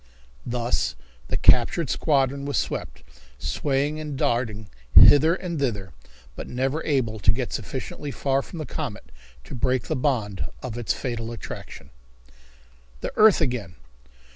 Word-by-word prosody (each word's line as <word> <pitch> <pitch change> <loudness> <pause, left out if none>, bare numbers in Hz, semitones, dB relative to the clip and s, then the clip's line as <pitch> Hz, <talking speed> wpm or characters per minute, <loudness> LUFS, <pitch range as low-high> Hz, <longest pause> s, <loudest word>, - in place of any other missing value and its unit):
Thus 120 0 -1 0.3
the - - -1
captured 125 +5 +4
squadron 140 -2 +1
was 140 -3 -1
swept, - - -3 0.3
swaying 145 +2 -1
and 150 -3 -5
darting 110 -5 -1 0.3
hither 145 - +8
and 175 -4 -4
thither, 100 -9 -2 0.4
but - - -7
never 135 +5 -1
able 120 -7 0
to - - +4
get - - -3
sufficiently 145 - -5
far 135 0 0
from 170 - -10
the 155 - -4
comet 140 - -6 0.3
to - - -11
break 130 0 0
the - - -2
bond 120 -8 -1 0.2
of 125 -3 -5
its 120 -2 -2
fatal 115 -2 -4
attraction. 115 - -9 1.1
The - - -4
Earth 215 -4 +6
Again! 120 - -2
130 Hz, 140 wpm, -24 LUFS, 115-145 Hz, 1.1 s, hither